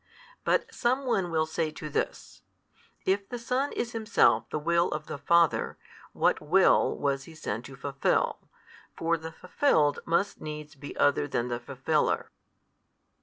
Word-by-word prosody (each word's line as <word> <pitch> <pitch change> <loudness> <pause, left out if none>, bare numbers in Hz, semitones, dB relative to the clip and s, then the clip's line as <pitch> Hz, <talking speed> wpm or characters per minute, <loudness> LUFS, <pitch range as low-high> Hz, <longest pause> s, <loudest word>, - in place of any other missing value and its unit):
But - - +1
some 260 +3 0
one 195 -8 +1
will 160 -1 +1
say 160 0 -1
to 160 -6 -7
this: 150 - -4 0.6
"If 195 +1 0
the 245 - -4
Son 250 +4 -1
is 240 - -2
Himself 225 -1 +2
the - - -2
Will 170 +3 +2
of 150 0 -4
the 145 - -6
Father, 170 +3 +2 0.3
what - - +1
will - - +4
was 140 -1 -1
He 165 - -13
sent 115 -6 -4
to 135 - -11
fulfil? 135 +1 0 0.6
for 165 +1 +1
the 160 0 -7
fulfilled 160 - +2
must 170 +5 0
needs 150 0 -7
be 145 -1 -9
other 145 0 +3
than 125 -3 -1
the 120 0 -2
fulfiller." 135 +5 -1
160 Hz, 155 wpm, -28 LUFS, 145-190 Hz, 0.6 s, will